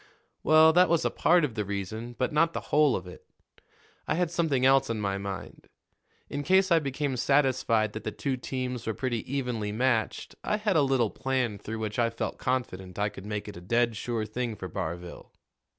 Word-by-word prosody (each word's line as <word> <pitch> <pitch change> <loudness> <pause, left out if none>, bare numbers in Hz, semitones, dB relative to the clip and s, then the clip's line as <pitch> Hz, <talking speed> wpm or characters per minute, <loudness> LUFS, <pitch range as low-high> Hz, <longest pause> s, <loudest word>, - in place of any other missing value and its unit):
"Well, 155 +1 +6
that 180 +1 +5
was 170 -1 +2
a - - +1
part 170 -1 +4
of 130 - -5
the 105 -1 -2
reason, 100 +4 -5
but 130 +4 -1
not 165 +2 +3
the - - -2
whole 150 -4 +5
of 95 - -4
it. 90 - -11 0.8
I - - +1
had 175 -1 0
something 155 -7 +1
else 135 -1 +4
on 115 -2 -1
my 100 -1 -1
mind. 100 -1 -7 0.6
In 145 - -4
case 190 +4 +3
I 165 - +6
became 140 -1 -2
satisfied 130 -5 +2
that 110 - -6
the - - -3
two 135 -2 -2
teams 125 -2 -4
were 110 - -1
pretty 125 -2 -3
evenly 125 -6 -2
matched, 115 0 0
I 210 - 0
had 210 -3 0
a 155 - +5
little 135 -5 +2
plan 125 -6 -1
through 110 +2 -5
which 110 +2 -3
I 115 -1 +3
felt 115 - -4
confident 95 -8 -3
I 105 0 +1
could 100 -1 -10
make 105 -1 -4
it 105 - -8
a - - -9
dead 115 +5 +1
sure 115 0 -2
thing 115 +1 -3
for 95 -2 -6
Barville. 85 -1 -6
120 Hz, 205 wpm, -28 LUFS, 105-140 Hz, 0.8 s, Well